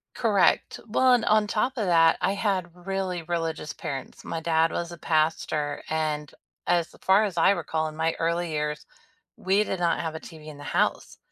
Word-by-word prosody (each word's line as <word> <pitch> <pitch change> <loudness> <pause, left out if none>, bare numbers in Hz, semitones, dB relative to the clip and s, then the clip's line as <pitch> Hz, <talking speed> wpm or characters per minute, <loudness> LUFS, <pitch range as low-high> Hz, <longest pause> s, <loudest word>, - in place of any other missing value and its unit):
Correct, 210 -5 +2
well, 255 +3 +3
and 245 -2 +3
on 215 -1 +3
top 250 +6 0
of 220 -5 -1
that, 165 -2 +5
I 195 - +1
had 185 -4 -2
really 190 -3 -2
religious 165 -3 -3
parents. 135 -2 -7
My 165 - -4
dad 165 0 +2
was 170 0 -4
a - - -7
pastor, 155 -2 0
and 155 -2 -2 0.4
as 175 -1 +1
far 195 +3 +4
as 195 -5 -3
I 165 - +5
recall 160 -4 -1
in 155 - -10
my 160 +1 0
early 170 +1 0
years, 150 0 -3 0.5
we 195 +3 +2
did 190 -3 -3
not 170 -1 +2
have 160 -1 -3
a 160 - -6
TV 155 -2 -12
in 155 -1 -9
the - - -10
house. - - -1
170 Hz, 190 wpm, -26 LUFS, 160-195 Hz, 0.5 s, that